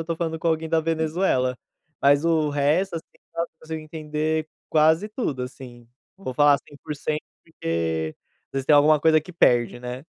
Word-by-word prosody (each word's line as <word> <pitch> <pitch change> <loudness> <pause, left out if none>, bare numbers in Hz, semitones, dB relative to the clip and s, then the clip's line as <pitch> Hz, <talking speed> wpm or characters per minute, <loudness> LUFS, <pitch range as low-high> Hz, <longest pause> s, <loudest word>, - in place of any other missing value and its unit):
estou 165 0 -3
falando 160 -1 -2
com 165 - 0
alguém 160 0 0
da 165 0 +2
Venezuela, 160 -5 0 0.5
mas 145 +2 +5
o 160 -2 +2
resto 155 +6 +1
assim, 160 - -6 0.3
nossa, 170 0 -2
consigo 160 0 -6
entender 155 0 -3 0.2
quase 160 +6 +3
tudo, 155 - -3
assim. 120 -2 -10 0.3
Não 195 - -17
vou 130 - -4
falar 145 0 +5
100% 150 +1 -5 0.2
porque, 80 - -2 0.3
às - - -78
vezes, 135 -1 -3
tem 150 - +6
alguma 150 +1 +5
coisa 155 0 +5
que 180 +4 -12
perde, 120 -6 +3
né. 125 +3 -6
155 Hz, 170 wpm, -24 LUFS, 135-160 Hz, 0.5 s, tem